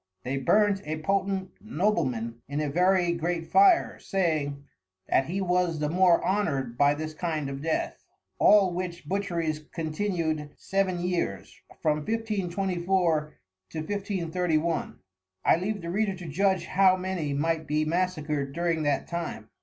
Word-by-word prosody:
They 135 +2 -2
burnt 200 +8 +3
a 155 +1 -4
Potent 190 +2 -1
Nobleman 135 - -1
in 145 +1 -2
a 150 -2 -1
very 180 +2 +3
great 170 0 -2
Fire, 385 - +4
saying, 155 -7 -1 0.4
That 135 - +2
he 190 +4 -2
was 180 -2 +1
the 150 0 -1
more 180 -1 +4
Honour'd 140 - 0
by 145 +3 +4
this 155 +1 -5
kind 155 -3 -2
of 135 0 -6
Death. 160 +1 -2 0.4
All 200 -4 +6
which 175 -1 -5
Butcheries 170 -6 -1
continued 160 -2 -2
Seven 190 -2 -1
Years, 175 - -3 0.2
from 150 -1 +3
1524, 180 -4 -1 0.3
to - - -8
1531. 170 -2 -1 0.5
I - - +5
leave 200 +1 -3
the 170 - -4
Reader 200 0 0
to 175 -2 -9
judge 190 +5 +1
how 190 -1 +4
many 180 -6 -2
might 160 +1 0
be 150 +1 +1
Massacred 155 -5 -1
during 170 0 0
that 145 -3 0
time. 170 -10 -5
170 Hz, 140 wpm, -27 LUFS, 155-190 Hz, 0.5 s, All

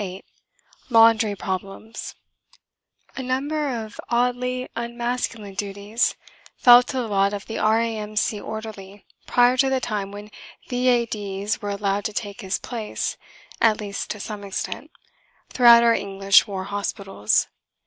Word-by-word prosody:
VIII 190 -1 -6 0.7
LAUNDRY 225 -2 +5
PROBLEMS 195 +4 -6 1.0
A - - -4
number 280 +4 -1 0.2
of 215 - -14
oddly 250 +1 0
unmasculine 235 -3 -3
duties 205 +3 -1 0.4
fell 245 0 +8
to 255 +1 -5
the 245 -3 -1
lot 200 -1 +2
of 205 0 -5
the 225 - -5
R.A.M.C. 215 -1 0
orderly 205 -2 -8 0.2
prior 245 +1 +4
to 270 +1 +3
the 265 0 +1
time 210 -5 -3
when 205 +1 -10 0.4
"V.A.D.'s" 225 -5 0
were 205 - -4
allowed 200 0 -1
to 215 - -2
take 205 0 -5
his 190 -1 -1
place 225 -4 -4 0.5
(at 220 -2 +4
least 200 -2 -5
to 210 - -4
some 210 0 -6
extent) 200 0 -5 0.6
throughout 235 -2 +7
our 235 0 +5
English 195 0 +3
war 195 -2 -4
hospitals. 195 - -1
215 Hz, 130 wpm, -23 LUFS, 200-240 Hz, 1.0 s, fell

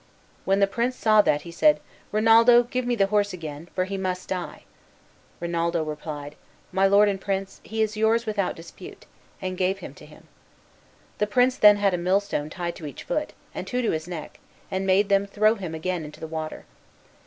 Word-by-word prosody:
When 195 +1 +2
the 200 - +5
prince 235 +5 -1
saw 215 -3 +5
that 150 -7 +1
he 170 - -9
said, 300 - +4 0.3
"Rinaldo, 230 +3 +6
give 245 +1 -3
me 245 - +1
the 200 -4 +3
horse 205 -1 +2
again, 160 -1 -8
for 185 - +1
he 195 +1 -4
must 185 -1 -3
die." 180 -2 -5 0.8
Rinaldo 170 -1 -1
replied, 150 -1 -6 0.4
"My 190 +1 +3
lord 200 +2 +5
and 195 -1 -1
prince, 195 -1 -3
he 220 +1 -1
is 215 0 -2
yours 220 +2 +2
without 205 -4 -1
dispute," 165 - -12 0.4
and 185 0 -3
gave 190 +1 +1
him - - -9
to - - -15
him. - - -17 0.9
The 210 - +1
prince 250 +4 +3
then 210 -3 +7
had 200 -2 +2
a 180 - 0
millstone 185 -4 0
tied 170 0 -4
to 155 - -7
each 145 - -9
foot, 300 - -2 0.2
and - - -6
two 250 0 -1
to 230 - +1
his 160 +1 -3
neck, 170 -4 -7 0.3
and 190 0 -2
made 195 +2 +3
them 200 0 +3
throw 215 +2 +3
him 185 -7 -6
again 175 +1 -3
into 150 0 -10
the - - -6
water. 155 -1 -6
195 Hz, 200 wpm, -25 LUFS, 170-215 Hz, 0.9 s, then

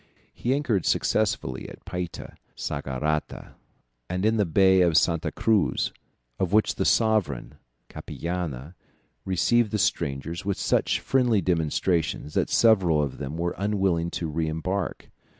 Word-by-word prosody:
He 125 +3 0
anchored 120 - 0
successively 105 -12 0
at - - -14
Payta, 90 -2 -5 0.2
Saugarata, 75 +2 -3 0.6
and 90 +3 -1
in 110 +1 +3
the 105 -3 +2
Bay 95 +2 +4
of 85 -3 +4
Santa 85 0 +2
Cruz, 110 -3 +1 0.5
of 95 -2 0
which 110 +1 +3
the - - -2
sovereign, 110 - +1 0.3
Capillana, 85 -4 -5 0.5
received 110 +5 +2
the 105 - -1
strangers 85 -4 -1
with 100 0 -2
such - - +1
friendly 125 -5 +2
demonstrations, 80 -2 0
that - - 0
several 95 -9 +4
of 70 -3 -2
them 70 +2 -5
were 85 +1 -1
unwilling 95 -5 0
to 85 - -4
re 80 +1 -2
embark. 90 +5 -3
90 Hz, 135 wpm, -25 LUFS, 80-105 Hz, 0.6 s, Bay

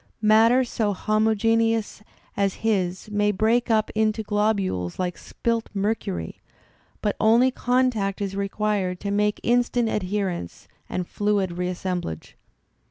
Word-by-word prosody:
' - - -46
Matter 230 +4 +5
so 220 -4 -1
homogeneous 220 +1 +1 0.3
as 200 -1 0
his 190 -2 0
may 210 0 +2
break 225 +5 +1
up 220 -1 +2
into 220 0 +1
globules 205 - 0
like 180 -1 -2
spilt 230 -1 -3
mercury, 195 - -2 0.6
but 210 - 0
only 235 +4 +4
contact 245 -6 0
is 195 -1 -3
required 200 -2 -1
to 200 - -3
make 210 +1 +1
instant 240 -1 +2
adherence 185 - -3 0.2
and 180 - -2
fluid 205 -1 0
reassemblage. 180 - -4
210 Hz, 120 wpm, -24 LUFS, 190-225 Hz, 0.6 s, Matter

